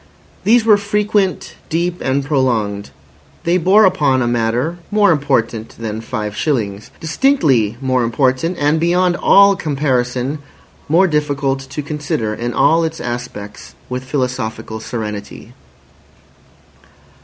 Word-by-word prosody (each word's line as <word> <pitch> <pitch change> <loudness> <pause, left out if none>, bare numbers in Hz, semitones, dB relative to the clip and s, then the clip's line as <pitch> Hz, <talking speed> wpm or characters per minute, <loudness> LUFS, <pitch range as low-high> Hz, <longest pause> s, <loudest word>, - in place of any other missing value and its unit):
These 230 +1 +4
were 215 -2 +6
frequent, 205 -3 -1 0.2
deep, 175 +2 -1
and 135 +1 0
prolonged; 115 -8 0 0.5
they 175 +2 +2
bore 195 +5 +5
upon 140 -8 +2
a - - 0
matter 120 +8 -1
more 210 -2 +4
important 120 -7 -1
than 110 -1 -5
five 105 -2 -4
shillings. 105 -9 -2
Distinctly 155 - +1
more 130 -2 +1
important, 130 +8 0
and 145 +2 +1
beyond 175 +2 +2
all 200 0 +5
comparison 135 -3 -1 0.5
more 175 +5 +5
difficult 145 -4 0
to 145 +2 -5
consider 145 -7 -3
in 120 +2 -3
all 165 +6 +3
its 160 0 -3
aspects 120 -4 -7
with 125 0 -4
philosophical 125 -5 -3
serenity. 105 -3 -6
135 Hz, 120 wpm, -17 LUFS, 120-170 Hz, 0.5 s, were